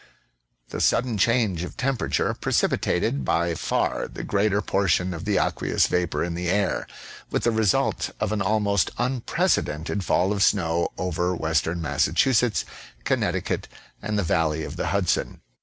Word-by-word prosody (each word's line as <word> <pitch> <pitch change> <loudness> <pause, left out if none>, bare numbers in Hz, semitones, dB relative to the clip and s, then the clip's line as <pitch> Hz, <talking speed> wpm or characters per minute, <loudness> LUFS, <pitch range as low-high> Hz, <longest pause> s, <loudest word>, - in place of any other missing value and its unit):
The - - -4
sudden 120 -4 +2
change 110 -6 +2
of 90 - -8
tem 135 +1 0
perature - - -1
precipitated 70 -1 +1
by 85 +6 +1
far - - -1
the - - -8
greater 100 0 +1
portion 95 -3 +1
of 85 +3 -7
the 105 -2 +1
aqueous - - +1
vapor 85 -4 0
in 85 0 -2
the 85 +1 -2
air, 100 +1 0 0.4
with - - -1
the 120 - +3
result 110 -3 +1
of 105 - -1
an 105 -2 -1
almost 100 -1 +1
unprecedented 105 - 0
fall 95 +3 +2
of 100 - -2
snow 85 -4 +2
over 90 0 -1
western 80 +1 -1
Massachusetts, 120 - +2 0.4
Connecticut, - - -1 0.3
and 105 0 -2
the 100 - +1
valley 80 -2 0
of 75 +2 -6
the - - -2
Hudson. 100 -3 0
95 Hz, 150 wpm, -24 LUFS, 85-105 Hz, 0.4 s, the